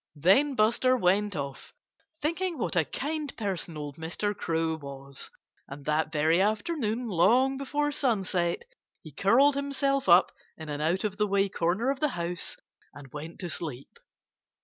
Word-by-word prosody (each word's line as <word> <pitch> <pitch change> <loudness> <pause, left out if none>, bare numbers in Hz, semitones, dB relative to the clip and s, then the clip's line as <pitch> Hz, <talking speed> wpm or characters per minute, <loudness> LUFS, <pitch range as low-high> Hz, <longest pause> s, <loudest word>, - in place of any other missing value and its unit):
Then 200 - +4
Buster 240 +3 +3
went 200 0 +2
off, 140 -2 -6 0.5
thinking 340 +2 -1
what 230 - -2
a 165 -3 +3
kind 300 - -4
person 190 -6 -3
old 145 -2 -6
Mr. 175 +6 -3
Crow 165 -3 -1
was. 140 -2 -9 0.4
And 140 0 -10
that 155 +1 0
very 160 +3 +3
afternoon, 220 - -1
long 235 +8 +3
before 290 +2 -1
sunset, 195 - 0 0.4
he 155 - -10
curled 240 - +4
himself 275 -3 0
up 175 +1 +6 0.3
in 160 -1 -8
an 145 0 -3
out 170 +5 +1
of 205 -2 -2
the 210 -1 +1
way 200 0 +2
corner 190 +8 0
of 275 - -4
the 305 - +2
house 170 0 -4 0.4
and 140 -3 -12
went 155 +3 -7
to 175 - -4
sleep. 140 -6 -7
195 Hz, 155 wpm, -28 LUFS, 160-260 Hz, 0.5 s, up